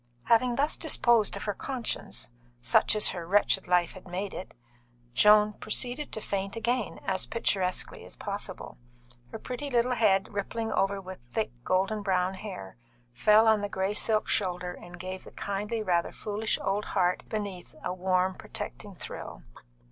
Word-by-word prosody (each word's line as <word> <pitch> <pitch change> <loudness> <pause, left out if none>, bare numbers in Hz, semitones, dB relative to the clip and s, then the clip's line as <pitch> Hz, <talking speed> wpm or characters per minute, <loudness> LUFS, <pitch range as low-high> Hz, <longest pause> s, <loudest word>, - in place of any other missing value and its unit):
Having 240 +1 +4
thus 290 +4 +1
disposed 240 -8 +3
of - - -5
her 205 - -1
conscience 245 - -4 0.3
such 120 - +3
as 210 - +5
her 170 -2 -5
wretched 195 0 +3
life 180 -1 +3
had 185 -1 -12
made 185 +2 -3
it 185 - -7 0.6
Joan 210 +8 +6
proceeded 245 +7 -2
to - - -2
faint 195 0 -2
again, 235 0 -1
as 190 -1 0
picturesquely 190 -5 -1
as - - -9
possible. - - -5 0.5
Her - - -6
pretty 255 +5 -5
little 245 -1 +2
head, 205 -4 +3
rippling 225 +3 -2
over 195 0 +1
with 185 -1 -8
thick, 220 - 0
gold 185 - +2
brown 185 -1 +1
hair, 185 - -8 0.3
fell 210 - +5
on 220 -2 +5
the 205 - -2
grey 190 +1 -1
silk 215 0 +2
shoulder 180 -3 0
and 175 0 -11
gave 185 +1 -5
the - - -11
kindly, 210 +3 -2
rather 175 -4 +1
foolish 215 +1 -2
old 200 +2 0
heart 180 -2 +1
underneath 200 -5 -5
a 180 - -1
warm, 185 0 +1
protecting 205 0 -6
thrill. - - -7
200 Hz, 160 wpm, -29 LUFS, 185-220 Hz, 0.6 s, Joan